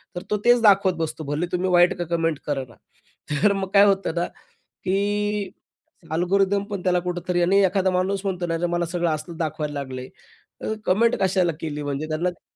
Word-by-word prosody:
तर 175 - -4
तो 210 - +2
तेच 240 -1 +5
दाखवत 195 -3 +5
बसतो. 160 -1 -3
भले 145 +4 -2
तुम्ही 180 +1 0
वाईट 175 0 +5
का 175 - -2
कमेंट 165 -2 -1
करे 140 -2 -1
ना. 115 - -16 0.7
तर 210 - +5
मग 195 -1 -2
काय 200 - +7
होतं 195 -4 +1
ना, 170 0 +1 0.6
की 205 +1 0 0.6
अल्गोरिथम 195 +4 +2
पण 200 -3 -4
त्याला 180 -1 +2
कुठेतरी 175 0 -2
आणि 195 +3 +4
एखादा 190 0 +1
माणूस 185 +2 0
म्हणतो 185 -2 -1
ना 165 0 -1
च्या 175 +1 -1
मला 175 0 0
सगळं 170 0 -1
असलं 155 +2 -5
दाखवायला 155 -2 -3
लागलंय, 130 -2 -6 0.5
तर 220 - -2
कमेंट 230 +6 +3
कशाला 185 -2 +2
केली 150 -2 -4
म्हणजे 145 +2 -3
त्यांना 160 +3 0
कळत 175 - -13
180 Hz, 190 wpm, -23 LUFS, 160-195 Hz, 0.7 s, काय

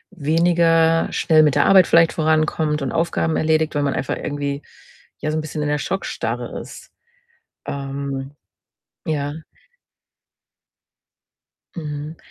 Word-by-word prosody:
weniger 165 0 +3
schnell 160 -2 +4
mit 150 -3 +3
der - - +4
Arbeit 190 -3 +6
vielleicht 165 -1 +5
vorankommt 155 -1 +1
und 135 - -2
Aufgaben 165 -1 0
erledigt, 155 0 +1
weil 145 - 0
man 140 - 0
einfach 130 - -2
irgendwie, 145 0 -3 0.6
ja, 155 - -2
so 155 - -1
'n - - 0
bisschen 155 0 -5
in 150 - -1
der 150 0 0
Schockstarre 195 +5 -3
ist. - - -11 0.8
Ähm, 140 -1 -4 0.7
ja. 145 -2 -2 2.4
Mhm. 150 -1 -6
155 Hz, 120 wpm, -21 LUFS, 145-165 Hz, 2.4 s, Arbeit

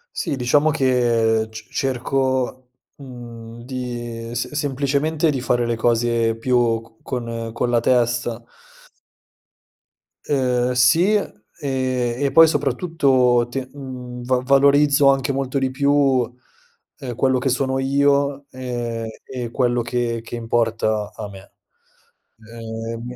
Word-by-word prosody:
Sì, - - -2
diciamo 145 +5 +2
che 120 -6 +2
c 110 +1 -10
cerco, 130 -1 -1 0.3
mhmm, 120 -3 -10
di 120 -2 -6
s 120 - -3
semplicemente 145 +2 0
di 135 -3 -2
fare 120 -1 +1
le 120 0 -1
cose 115 0 +1
più 120 -1 +1
co 115 0 -20
con 115 -3 -4
con 120 +1 -1
la 120 - +3
testa. 120 -1 +1 1.8
Ehm, 125 -3 +1
sì, 145 +11 +4
ehm, 210 - 0 0.3
e 130 -1 -1
poi 165 0 +8
soprattutto 135 -5 +2
te 130 0 -4
mhmm, 125 -3 -8
va 130 0 +1
valorizzo 140 +1 +5
anche 135 +1 0
molto 135 0 -2
di 135 -1 0
più, 135 -2 +2 0.7
ehm, 125 -4 -6
quello 130 +1 +2
che 135 +1 0
sono 130 +1 0
io, 140 +1 +1
ehm, 120 -3 -4 0.2
e 125 -3 -6
quello 120 -1 +1
che 115 -1 -2
che 120 - -7
importa 115 -2 0
a 105 -2 -6
me. 95 -1 -13 1.0
Ehm 115 0 -6
125 Hz, 120 wpm, -21 LUFS, 120-135 Hz, 1.8 s, poi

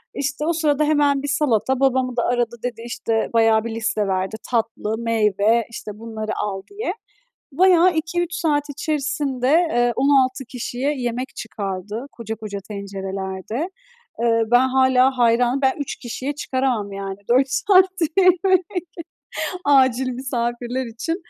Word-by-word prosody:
İşte, 285 +1 -2
o 340 - +2
sırada 305 -2 +1
hemen 290 -2 +2
bir 285 - -2
salata. 265 -3 +1
Babamı 260 -2 +1
da 240 - +2
aradı, 240 -1 0
dedi 240 -2 -4
işte 230 -1 -1
bayağı 225 -1 +4
bir 230 -1 -4
liste 220 -2 -1
verdi. 190 +2 -1 0.2
"Tatlı, 225 -2 -1
meyve, 225 0 +2
işte 215 - -7
bunları 220 -1 -5
al." 195 -2 -3
diye. 405 -1 -3 0.6
Bayağı 360 +1 +5
2-3 345 +2 -2
saat 300 -4 +1
içerisinde, 285 -3 -2
eee, 285 -8 +3
16 265 -1 +2
kişiye 250 +3 -3
yemek 250 +1 -3
çıkardı 205 +2 -5
koca 225 -1 -6
koca 210 -2 -6
tencerelerde. 195 - -4 0.5
Iıı, 230 -1 +1
ben 245 +2 +5
hâlâ 260 0 +3
hayranım. 245 +2 +3
Ben 265 -1 +3
3 285 - -3
kişiye 260 +4 -5
çıkaramam 255 -7 -1
yani 195 -1 -5
4 260 +3 +4
saatte 375 0 +3
yemek, 370 -1 +4 1.0
acil 265 -2 +4
misafirler 245 0 -3
için. 235 +9 -3
250 Hz, 135 wpm, -21 LUFS, 225-285 Hz, 1.0 s, Bayağı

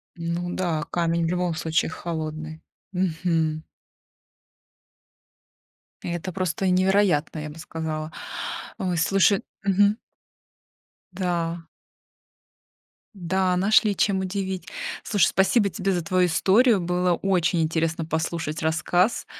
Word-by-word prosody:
Ну 170 +1 -3
да, 165 -5 -1
камень 170 -1 +1
в - - 0
любом 180 -1 0
случае 160 -1 0
холодный. 155 -1 -5 0.3
Мгм. 165 -3 0 2.4
Это 175 +2 -4
просто 185 +1 -1
невероятно, 185 -4 +2
я 150 0 -5
бы 155 +2 -11
сказала. 155 -1 -4 0.7
Ой, 180 -2 -1
слушай 195 +4 +3 0.2
Мгм. 200 +3 +3 1.1
Да. 175 -2 -2 1.5
Да, 185 0 0
нашли 205 +1 +4
чем 195 -2 +2
удивить. 190 -2 -3 0.4
Слушай, 205 -6 +3
спасибо 200 +2 +3
тебе 195 0 -1
за 175 -3 -1
твою 180 +1 +2
историю. 205 +6 +4
Было 180 0 +1
очень 175 -3 +1
интересно 160 0 0
послушать 160 -1 -2
рассказ, 175 +6 +1
175 Hz, 100 wpm, -24 LUFS, 165-190 Hz, 2.4 s, нашли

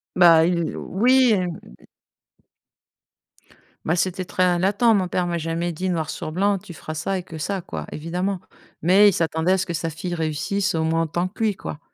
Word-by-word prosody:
Bah 170 -3 +7
il 170 -1 0
oui, 250 +4 +3
hem 180 -4 -1 0.2
d - - -21 2.0
Bah, 160 - +1
c'était 185 +1 -1
très 180 -1 +1
latent. 205 +5 +3
Mon 190 -3 +1
père 180 0 -1
m'a 175 -1 -1
jamais 165 +2 -2
dit 185 +4 -3
noir 160 -3 -1
sur 155 - -5
blanc: 200 +3 +2
«Tu 175 - -11
feras 155 - -7
ça 190 +5 -2
et 180 - -5
que 160 - -9
ça», 190 +5 -3
quoi, - - -6
évidemment, 180 +5 -3 0.4
mais 190 +5 +6
il - - -1
s'attendait 160 +2 +1
à - - +2
ce 190 - -1
que 170 - -4
sa 165 0 -2
fille 175 +3 -5
réussisse 165 +4 -1
au 160 - 0
moins 165 +1 +1
autant 175 +3 -1
que 220 - -5
lui, 215 -3 +1
quoi, 150 - -7
175 Hz, 200 wpm, -23 LUFS, 165-190 Hz, 2.0 s, Bah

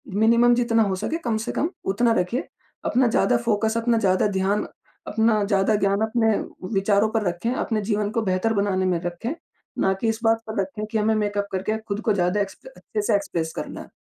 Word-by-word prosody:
Minimum 235 +3 +5
जितना 235 -2 +2
हो 195 -2 0
सके 310 - -2
कम 225 -3 0
से - - -2
कम 315 - 0 0.2
उतना 235 +3 +2
रखिए 205 +9 -2 0.4
अपना 250 0 +3
ज़्यादा 240 +2 +3
फ़ोकस 220 -1 0
अपना 230 0 +2
ज़्यादा 190 -2 +2
ध्यान, 195 +1 0 0.4
अपना 220 -1 +2
ज़्यादा 200 +1 +2
ज्ञान 200 +1 +1
अपने 225 0 +2 0.4
विचारों 200 +2 +2
पर 220 -1 0
रखें, 175 +7 -1
अपने 220 -4 -1
जीवन 205 0 -1
को 230 - 0
बेहतर 195 +2 0
बनाने 200 -2 +1
में 180 -2 +1
रखें। 175 - -4 0.5
ना 190 - +3
कि 230 - +1
इस 225 - -2
बात 225 0 +3
पर 220 -2 -3
रखें 195 +3 -4
कि 220 +1 -3
हमें 215 +1 +2
मेकअप 205 -1 -1
करके 195 +3 -1
ख़ुद 215 -2 -5
को 225 -3 +1
ज़्यादा 180 +1 +1
एक्स 195 -1 -4 0.2
अच्छे 210 - -4
से 210 0 +2
एक्सप्रेस 165 -5 -2
करना - - -6
है - - -11
215 Hz, 205 wpm, -23 LUFS, 195-225 Hz, 0.5 s, Minimum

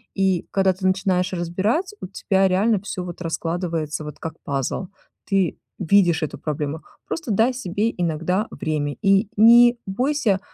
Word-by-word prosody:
и 190 -3 +1
когда 190 -1 +2
ты 185 +1 -2
начинаешь 185 -1 +1
разбирать, 200 - -1
у - - -5
тебя 195 0 +1
реально 200 +3 +2
всё 200 -3 -5
вот 180 0 -8
раскладывается 165 -2 -3
вот 150 0 -8
как 160 -2 -5
пазл. 140 +6 -2 0.4
Ты 195 -3 +1 0.2
видишь 175 -3 +3
эту 155 - -3
проблему, 150 +1 -4 0.2
просто 320 -9 -4
дай 225 +6 +3
себе 210 -1 -1
иногда 175 +5 -1
время 150 -2 -2
и 195 0 +3
не 235 +2 +7
бойся 245 -1 +1
190 Hz, 150 wpm, -22 LUFS, 165-210 Hz, 0.4 s, не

